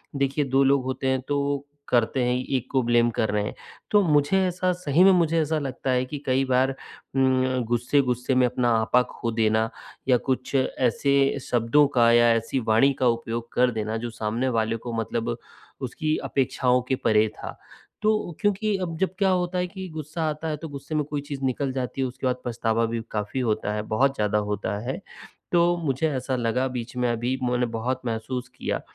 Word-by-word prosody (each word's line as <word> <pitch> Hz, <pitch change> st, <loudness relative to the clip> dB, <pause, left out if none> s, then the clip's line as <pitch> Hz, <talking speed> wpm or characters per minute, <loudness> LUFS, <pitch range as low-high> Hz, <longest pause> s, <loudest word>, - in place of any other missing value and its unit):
देखिए 140 Hz, +1 st, 0 dB
2 135 Hz, +1 st, +3 dB
लोग 135 Hz, 0 st, +3 dB
होते 130 Hz, +1 st, -2 dB
हैं 130 Hz, 0 st, +1 dB
तो 140 Hz, -1 st, -1 dB, 0.2 s
करते 120 Hz, +2 st, +2 dB
हैं 125 Hz, 0 st, +1 dB, 0.2 s
1 130 Hz, -, -2 dB
को 130 Hz, -, +3 dB
ब्लेम 120 Hz, 0 st, +3 dB
कर 110 Hz, -, +1 dB
रहे 105 Hz, 0 st, 0 dB
हैं। 105 Hz, -, -4 dB, 0.4 s
तो 210 Hz, -, +6 dB
मुझे 150 Hz, +2 st, +3 dB
ऐसा 180 Hz, 0 st, 0 dB
सही 175 Hz, -1 st, +2 dB
में 195 Hz, -, +8 dB
मुझे 165 Hz, -2 st, +2 dB
ऐसा 155 Hz, +1 st, 0 dB
लगता 135 Hz, -2 st, -4 dB
है 125 Hz, 0 st, +1 dB
कि 145 Hz, +3 st, -6 dB
कई 130 Hz, +1 st, +2 dB
बार 130 Hz, 0 st, +2 dB
उम, 130 Hz, -1 st, -1 dB
गुस्से-गुस्से 125 Hz, +1 st, +1 dB
में 125 Hz, -, +5 dB
अपना 125 Hz, 0 st, 0 dB
आपा 110 Hz, +3 st, +3 dB
खो 115 Hz, -, -3 dB
देना 110 Hz, 0 st, +1 dB, 0.4 s
या 125 Hz, -, +6 dB
कुछ 130 Hz, +1 st, -1 dB
ऐसे 130 Hz, +1 st, +1 dB, 0.4 s
शब्दों 120 Hz, +5 st, +4 dB
का 115 Hz, -1 st, +5 dB
या 120 Hz, 0 st, +5 dB
ऐसी 115 Hz, +4 st, -1 dB
वाणी 115 Hz, +6 st, +5 dB
का 130 Hz, -, +4 dB
उपयोग 115 Hz, 0 st, -2 dB
कर 125 Hz, 0 st, +3 dB
देना 110 Hz, 0 st, -2 dB
जो 120 Hz, +1 st, -4 dB
सामने 115 Hz, +3 st, -2 dB
वाले 110 Hz, 0 st, +1 dB
को 120 Hz, -, -3 dB
मतलब 115 Hz, +1 st, -2 dB, 0.5 s
उसकी 155 Hz, +5 st, -1 dB
अपेक्षाओं 125 Hz, -1 st, +1 dB
के 130 Hz, -, +3 dB
परे 110 Hz, -1 st, +4 dB
था। -, -, -7 dB, 0.4 s
तो 215 Hz, -5 st, 0 dB
क्योंकि 205 Hz, 0 st, +1 dB
अब 170 Hz, -4 st, -4 dB
जब 190 Hz, +1 st, 0 dB
क्या 195 Hz, -1 st, +3 dB
होता 180 Hz, -1 st, 0 dB
है 180 Hz, 0 st, 0 dB
कि 190 Hz, 0 st, -7 dB
गुस्सा 155 Hz, +1 st, -5 dB
आता 155 Hz, +2 st, -4 dB
है 155 Hz, -, -2 dB
तो 160 Hz, +2 st, -8 dB
गुस्से 140 Hz, +2 st, -6 dB
में 150 Hz, -, +2 dB
कोई 145 Hz, 0 st, -3 dB
चीज़ 140 Hz, -2 st, -5 dB
निकल 130 Hz, +1 st, -1 dB
जाती 130 Hz, +1 st, -3 dB
है। 130 Hz, -, +1 dB
उसके 130 Hz, +1 st, -4 dB
बाद 125 Hz, 0 st, -1 dB
पछतावा 115 Hz, -1 st, 0 dB
भी 115 Hz, 0 st, -2 dB
काफ़ी 105 Hz, +4 st, -3 dB
होता 110 Hz, -3 st, 0 dB
है, 105 Hz, -, -1 dB
बहुत 130 Hz, +6 st, +1 dB
ज़्यादा 105 Hz, -2 st, +1 dB
होता 100 Hz, 0 st, -2 dB
है। 135 Hz, -, -3 dB, 0.5 s
तो 175 Hz, 0 st, +3 dB
मुझे 155 Hz, -1 st, 0 dB
ऐसा 130 Hz, 0 st, -2 dB
लगा 125 Hz, +2 st, 0 dB
बीच 125 Hz, -1 st, -6 dB
में 125 Hz, -1 st, +1 dB
अभी 120 Hz, +3 st, -1 dB
मैंने 125 Hz, 0 st, +1 dB
बहुत 120 Hz, +3 st, -3 dB
महसूस 120 Hz, +2 st, -3 dB
किया -, -, -3 dB
130 Hz, 200 wpm, -25 LUFS, 120-145 Hz, 0.5 s, में